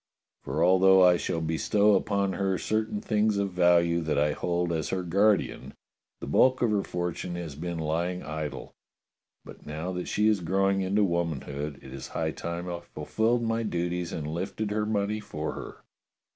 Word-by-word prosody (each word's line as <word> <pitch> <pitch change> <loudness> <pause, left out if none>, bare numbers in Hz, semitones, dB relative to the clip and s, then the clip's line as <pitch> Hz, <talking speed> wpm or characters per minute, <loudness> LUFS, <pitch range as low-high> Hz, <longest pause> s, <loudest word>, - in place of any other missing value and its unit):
^ - - -43
For 75 +5 -1
although 95 +1 +6
I 90 -1 +7
shall 85 -1 -2
bestow 100 +6 +2
upon 100 -1 +1
her 95 0 0
certain 110 0 -1
things 105 -1 +1
of 100 -1 -1
value 85 -1 +3
that 80 -1 -1
I 75 +1 +3
hold 85 +2 -1
as 80 -1 -2
her 95 -1 -1
guardian, 100 +4 +1 0.4
the - - -6
bulk 130 -1 +3
of 115 - +2
her 105 -2 +2
fortune 90 -1 -4
has 85 -4 -5
been 85 +4 -5
lying 85 +3 -2
idle, 75 -1 -5 0.7
but - - -12
now 80 +4 -4
that 90 -1 -4
she 105 +1 +2
is 105 -2 +3
growing 95 +3 +1
into 100 +3 +2
womanhood, 75 -5 -2
it 65 - -10
is 65 - -7
high 80 -1 -2
time 85 +5 -5
I 85 -1 -4
fulfilled 110 +9 -1
my 115 0 0
duties 90 -4 -2
and 75 - -4
lifted 95 +6 -3
her 105 0 0
money 105 0 0
for 75 -7 -5
her." - - -9
90 Hz, 180 wpm, -27 LUFS, 80-100 Hz, 0.7 s, I